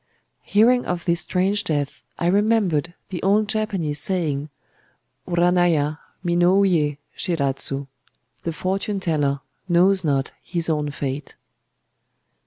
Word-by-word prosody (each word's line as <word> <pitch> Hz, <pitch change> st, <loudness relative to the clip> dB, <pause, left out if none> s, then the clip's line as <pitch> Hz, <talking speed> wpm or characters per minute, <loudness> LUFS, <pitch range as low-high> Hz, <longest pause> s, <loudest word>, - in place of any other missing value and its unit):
Hearing 240 Hz, +4 st, +4 dB
of 175 Hz, -1 st, -2 dB
this 170 Hz, -2 st, +2 dB
strange 195 Hz, +4 st, +1 dB
death 145 Hz, -4 st, -2 dB
I -, -, -2 dB
remembered 185 Hz, -4 st, +2 dB
the 180 Hz, -, -4 dB
old 205 Hz, +2 st, +3 dB
Japanese 200 Hz, -9 st, -1 dB
saying,—Uranaiya 165 Hz, +1 st, -1 dB, 0.3 s
minouyé 175 Hz, -4 st, +3 dB, 0.2 s
shiradzu: 140 Hz, -4 st, -1 dB, 0.6 s
"The 165 Hz, -, -2 dB
fortune 195 Hz, +4 st, -2 dB
teller 145 Hz, -6 st, 0 dB, 0.3 s
knows 185 Hz, +2 st, +4 dB
not 140 Hz, -3 st, 0 dB
his 170 Hz, -1 st, -1 dB
own 150 Hz, -1 st, 0 dB
fate." 140 Hz, 0 st, -5 dB
170 Hz, 100 wpm, -23 LUFS, 150-190 Hz, 0.6 s, Hearing